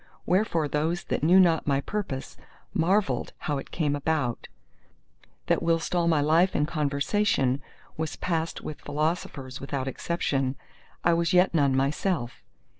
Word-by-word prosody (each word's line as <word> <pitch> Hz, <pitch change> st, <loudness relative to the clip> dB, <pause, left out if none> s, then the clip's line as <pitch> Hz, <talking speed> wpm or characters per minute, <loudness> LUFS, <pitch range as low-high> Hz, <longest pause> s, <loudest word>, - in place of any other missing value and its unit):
Wherefore 180 Hz, -5 st, +1 dB
those 160 Hz, +4 st, -1 dB
that -, -, -2 dB
knew 175 Hz, +5 st, +6 dB
not 170 Hz, -5 st, +4 dB
my 140 Hz, -1 st, +2 dB
purpose 140 Hz, -5 st, -4 dB, 0.4 s
marvelled 170 Hz, -, +1 dB
how 145 Hz, -2 st, -2 dB
it -, -, -9 dB
came 150 Hz, -4 st, 0 dB
about, 145 Hz, -5 st, -1 dB, 1.0 s
that -, -, +1 dB
whilst 165 Hz, 0 st, 0 dB
all 175 Hz, -1 st, +2 dB
my 160 Hz, -3 st, +3 dB
life 165 Hz, +5 st, +3 dB
and 150 Hz, -, +2 dB
conversation 140 Hz, -2 st, +1 dB, 0.4 s
was 160 Hz, 0 st, -3 dB
passed 165 Hz, -2 st, -2 dB
with 150 Hz, -, -7 dB
philosophers 145 Hz, -3 st, -3 dB
without 135 Hz, -1 st, -3 dB
exception, 135 Hz, -2 st, -1 dB, 0.5 s
I 170 Hz, -, +4 dB
was 170 Hz, 0 st, +1 dB
yet 180 Hz, +1 st, +4 dB
none 140 Hz, -4 st, +3 dB
myself. 140 Hz, 0 st, -1 dB
155 Hz, 140 wpm, -27 LUFS, 140-170 Hz, 1.0 s, knew